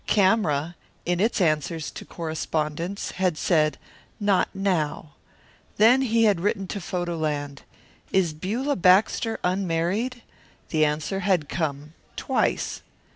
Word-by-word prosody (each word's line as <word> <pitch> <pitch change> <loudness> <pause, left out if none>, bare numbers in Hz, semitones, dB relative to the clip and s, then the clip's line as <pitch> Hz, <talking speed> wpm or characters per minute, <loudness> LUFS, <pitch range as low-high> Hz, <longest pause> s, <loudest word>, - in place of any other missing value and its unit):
Camera, 175 -6 +2 0.3
in 175 0 0
its 220 +4 +1
answers 155 -2 0
to - - -8
correspondents, 160 +2 -3
had 180 -3 0
said, 155 -3 +2 0.4
"Not 205 -3 +2
now." 175 -6 -1 0.6
Then 240 +5 +6
he 230 -3 +2
had 205 -5 +4
written 195 +1 0
to 200 - -4
Photo 175 -1 -3
Land: 145 -3 -3 0.5
"Is 180 -5 +2
Beulah 225 - -2
Baxter 195 +5 +3
unmarried?" 190 +7 -1 0.5
The 155 -1 +3
answer 150 +5 -1
had 185 -6 +1
come, 150 -2 -3 0.2
"Twice." - - -1
175 Hz, 120 wpm, -25 LUFS, 155-200 Hz, 0.6 s, Then